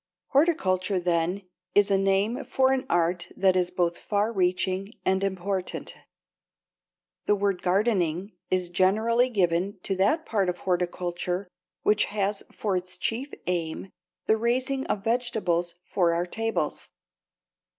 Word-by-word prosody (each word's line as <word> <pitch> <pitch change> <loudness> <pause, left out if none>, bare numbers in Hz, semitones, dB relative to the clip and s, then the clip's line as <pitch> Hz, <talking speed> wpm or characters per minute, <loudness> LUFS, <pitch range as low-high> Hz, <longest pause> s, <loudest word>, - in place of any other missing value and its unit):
Horticulture 195 - +2
then 175 +2 0 0.3
is 205 0 +5
a 195 - +5
name 195 +7 +1
for 265 0 +2
an 260 -1 -2
art 175 +1 +1
that 190 -1 +4
is 180 -1 +2
both 175 -1 0
far 210 +2 0
reaching 185 +2 0
and 190 +1 +2
important. 190 -1 -3 1.3
The 210 - +3
word 200 -2 0
gardening 190 -2 +1 0.2
is 180 -1 0
generally 220 +7 +3
given 190 -2 +1
to 195 - -1
that 300 - +2
part 200 -4 +1
of 180 - -2
horticulture 180 +1 -2 0.4
which 210 0 +3
has 205 -1 -1
for 205 -3 -2
its 185 0 -3
chief 240 +10 -2
aim 175 +1 -2 0.3
the 220 - +3
raising 255 +4 0
of 195 - -1
vegetables 215 -8 0
for 175 -3 +1
our 170 +1 0
tables. 225 +5 -2
195 Hz, 130 wpm, -26 LUFS, 180-215 Hz, 1.3 s, is